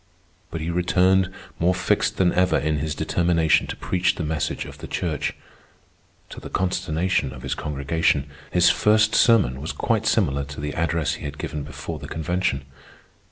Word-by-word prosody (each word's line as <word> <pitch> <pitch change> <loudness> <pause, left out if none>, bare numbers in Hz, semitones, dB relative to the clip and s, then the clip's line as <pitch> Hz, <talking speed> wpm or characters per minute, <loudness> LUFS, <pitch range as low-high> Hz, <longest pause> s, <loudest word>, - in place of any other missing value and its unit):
But 80 - -5
he 80 +2 -2
returned 90 +2 +3 0.3
more 90 +2 +3
fixed - - +1
than 90 -2 +3
ever 90 0 +3
in 75 0 0
his 75 +1 -2
determination 85 -2 +2
to - - -4
preach 90 -1 0
the 85 - -3
message 75 -2 -2
of - - -11
the - - -7
Church. 80 -4 -2 1.0
To - - -8
the - - -9
consternation 90 -4 0
of 65 -1 -10
his - - -2
congregation, 75 0 0 0.2
his - - +5
first 110 +1 +3
sermon 95 - +4
was 80 - -3
quite 110 -1 0
similar 70 -12 +2
to 70 +1 -9
the 75 0 -3
address 80 -2 0
he 80 - -7
had 70 0 -6
given 75 - -4
before 70 -1 -6
the - - -8
Convention. 80 -4 -1
80 Hz, 170 wpm, -23 LUFS, 75-90 Hz, 1.0 s, his